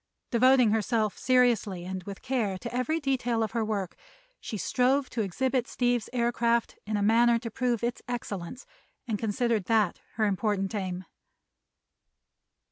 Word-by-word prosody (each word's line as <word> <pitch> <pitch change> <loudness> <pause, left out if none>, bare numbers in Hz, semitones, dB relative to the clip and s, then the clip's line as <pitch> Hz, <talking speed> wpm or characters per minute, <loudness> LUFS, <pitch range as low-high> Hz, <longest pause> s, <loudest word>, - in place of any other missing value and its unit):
Devoting 250 -1 +5
herself 215 0 +1
seriously 235 -8 +2
and 185 0 -4
with 200 -1 -8
care 235 -7 -1
to 235 +5 -6
every 310 +6 0
detail 245 -5 0
of 215 - -3
her 230 -1 0
work 205 -4 -3 0.4
she 215 - -5
strove 255 - +1
to 230 - -1
exhibit 255 +6 0
Steve's 245 -2 0
aircraft 235 -1 +1
in 215 0 0
a 205 - 0
manner 235 +2 +5
to 230 0 -6
prove 240 -1 -1
its 240 0 -2
excellence, 235 -2 -5 0.4
and 215 -3 -1
considered 225 -1 0
that 215 -4 +2
her 220 - +1
important 200 -1 0
aim. 185 -3 -3
230 Hz, 145 wpm, -28 LUFS, 205-245 Hz, 0.4 s, Devoting